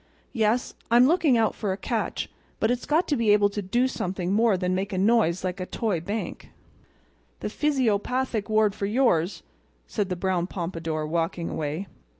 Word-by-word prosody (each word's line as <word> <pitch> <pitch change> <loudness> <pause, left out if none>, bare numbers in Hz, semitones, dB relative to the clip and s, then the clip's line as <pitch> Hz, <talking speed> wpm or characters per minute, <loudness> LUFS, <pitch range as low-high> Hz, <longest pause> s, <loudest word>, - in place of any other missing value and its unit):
Yes, 225 +1 +1 0.2
I'm 240 +2 +6
looking 305 -4 +4
out 225 -1 +2
for 205 -3 -2
a 190 - -2
catch; - - -2 0.3
but 220 - +2
it's 245 0 -2
got 315 +4 +2
to 295 - +3
be 230 -4 +1
able 205 -1 +4
to 205 +1 -4
do 240 +7 +1
something 185 -6 -2
more 220 -2 +3
than 180 0 -1
make 195 +3 -2
a 190 - -2
noise 195 -4 +3
like 185 +1 -3
a 185 - -4
toy 210 -7 -1
bank." 205 +6 -5 0.9
"The - - -2
physiopathic 250 -4 0
ward 215 -1 +3
for 200 -1 -3
yours!" 210 -7 +1 0.4
said 205 -3 -2
the 180 - -1
brown 180 -1 0
pompadour, 165 -4 -3
walking 165 +1 -1
away. 155 +5 -3
205 Hz, 175 wpm, -26 LUFS, 180-235 Hz, 0.9 s, I'm